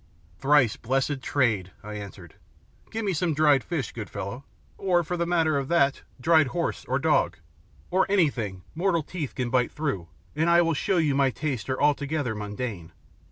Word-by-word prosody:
"Thrice 135 -5 +4
blessed 135 +3 -1
trade!" 110 -9 +1
I 105 +1 -7
answered. 100 -3 -9 0.6
"Give 225 0 -3
me 195 - +1
some 165 -1 0
dried 145 -4 +4
fish, 145 -5 -3
good 110 -4 -7
fellow, 100 +8 -6 0.3
or, 180 -3 +2
for 180 +3 -3
the 170 -1 -1
matter 160 -4 +2
of 135 - -4
that, 140 -4 +2 0.2
dried 155 +2 +4
horse 120 - -2
or - - 0
dog, - - +2 0.5
or 190 +1 +3
anything 120 - +1
mortal 170 -1 +1
teeth 155 -4 -5
can 125 -2 -2
bite 125 -1 +2
through, 120 - -3 0.3
and 160 +3 +2
I 170 0 +6
will 165 0 +1
show 180 +5 0
you 155 -4 +2
my 135 -1 +3
tastes 135 -3 -3
are 130 - -1
altogether 145 -3 +1
mundane." 105 -5 -5
140 Hz, 175 wpm, -26 LUFS, 120-165 Hz, 0.6 s, I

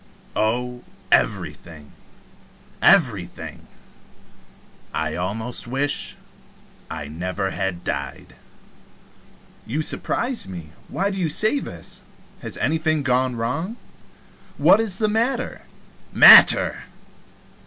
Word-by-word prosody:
"Oh, 125 +3 -2 0.3
everything, 80 -4 -1 0.9
everything. - - +1 1.3
I 80 0 -2
almost 110 +8 -3
wish 135 +4 -2 0.7
I 75 - -6
never 90 +5 -4
had 90 -2 -4
died." - - -5 1.3
"You 150 +7 -2
surprise 245 - -2
me. 85 -5 -9 0.2
Why 195 +2 -2
do 195 - -5
you 165 - 0
say 215 - +1
this? - - -8 0.4
Has - - -5
anything 155 -2 0
gone 130 -1 +1
wrong? 160 - -3 0.8
What - - +5
is 215 -5 -1
the 215 - +1
matter?" 240 +4 -1 0.5
"Matter! - - +8
125 Hz, 90 wpm, -22 LUFS, -, 1.3 s, Matter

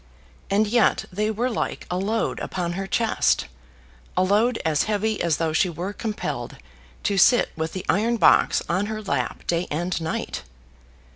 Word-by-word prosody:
And 205 +2 +3
yet 225 +1 +2
they 210 +3 0
were 235 +4 -1
like - - -3
a - - 0
load 220 +4 -1
upon 175 -2 -3
her 195 +2 -4
chest, 225 - +1 0.7
a 185 - +4
load 215 +5 +2
as 155 -2 +2
heavy 215 0 0
as 170 -3 +1
though 160 -2 -1
she 180 +3 +3
were 175 +4 -4
compelled 215 0 -4 0.5
to 200 -2 +1
sit 245 +6 +5
with 160 0 -3
the 185 - -5
iron 230 +4 +2
box - - +4
on 185 +4 0
her 215 0 -4
lap 200 - -2
day 170 +1 0
and 170 +3 -2
night. 160 - -3
200 Hz, 165 wpm, -24 LUFS, 175-220 Hz, 0.7 s, sit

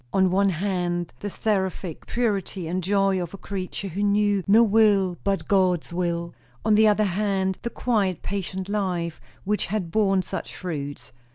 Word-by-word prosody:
On 190 -1 +3
one 195 +1 +3
hand, 175 -1 -1
the 205 - -4
seraphic 190 -5 -2
purity 200 -6 -1
and 180 +2 -2
joy 195 0 +2
of 175 +2 -5
a - - -9
creature 195 0 -5
who 190 +4 -4
knew 205 -1 +2
no 220 +4 +7
will 205 -4 +4
but 195 -1 -1
God's 185 -4 +2
will; 170 -1 -2 0.3
on 220 - +4
the 215 +1 +6
other 215 0 +4
hand, 190 -1 0
the 235 - -3
quiet, 205 -8 0
patient 190 -1 -4
life, 180 -5 -2 0.2
which 210 +2 0
had 195 -6 -2
borne 195 -2 +2
such - - -6
fruits. 145 -5 -5
195 Hz, 165 wpm, -25 LUFS, 180-205 Hz, 0.3 s, no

